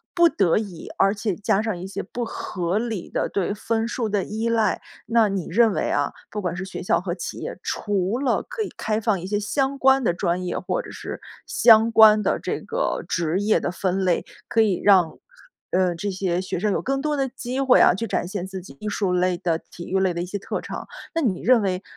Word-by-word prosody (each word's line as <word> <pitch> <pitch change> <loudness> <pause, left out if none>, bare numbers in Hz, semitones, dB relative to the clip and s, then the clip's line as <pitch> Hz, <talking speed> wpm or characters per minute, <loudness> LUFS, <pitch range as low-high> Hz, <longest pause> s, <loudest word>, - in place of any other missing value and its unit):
不 345 -1 +6
得 190 - +2
已， 200 -6 -5
而 195 +1 +4
且 205 -2 -2
加 200 0 +1
上 220 -4 -2
一 175 - -7
些 190 - -4
不 240 +5 -5
合 185 -4 -2
理 225 -6 -4
的 - - -1
对 200 0 -1
分 225 +2 -1
数 235 -2 -2
的 205 -2 0
依 220 +2 -3
赖。 230 -2 +1 0.3
那 230 -2 +4
你 195 -3 -3
认 225 +3 +4
为 - - -1
啊， 145 0 +1 0.2
不 210 - -3
管 180 -3 -2
是 185 - -4
学 190 - -7
校 180 - +1
和 180 -2 -3
企 175 - -6
业， - - -6
除 205 +1 -1
了 275 - +1
可 - - -5
以 425 - -2
开 215 0 -1
放 210 -3 +1
一 180 - -6
些 205 +1 0
相 270 +6 -1
关 265 0 +4
的 175 - +3
专 175 +1 -1
业， 180 - -2
或 - - -2
者 - - -11
是 - - -7 0.3
相 225 -1 +5
关 215 -1 +7
的 - - +1
这 - - -3
个 - - -2
职 170 +1 0
业 210 +1 +3
的 - - -2
分 190 +1 -1
类， 180 -2 +1 0.2
可 225 - +3
以 205 -5 +1
让， 185 -5 +4 0.5
呃， 185 -1 +2
这 200 +5 -3
些 185 -2 -1
学 185 - -3
生 210 +2 +1
有 - - 0
更 270 +1 -1
多 300 0 -1
的 270 -1 +1
机 255 0 -5
会 265 -2 +5
啊， - - +6
去 225 +5 -3
展 195 - -1
现 190 -1 -4
自 190 -1 -6
己 140 -6 -14
艺 215 - -6
术 200 -2 0
类 180 0 +1
的、 165 -2 -1
体 175 - -11
育 190 - +1
类 190 -2 +2
的 170 - -3
一 - - -4
些 200 +3 -5
特 - - -4
长。 - - -7 0.3
那 330 - 0
你 210 - 0
认 250 -2 +4
为， 190 -1 -1
200 Hz, 255 characters per minute, -23 LUFS, 180-230 Hz, 0.5 s, 关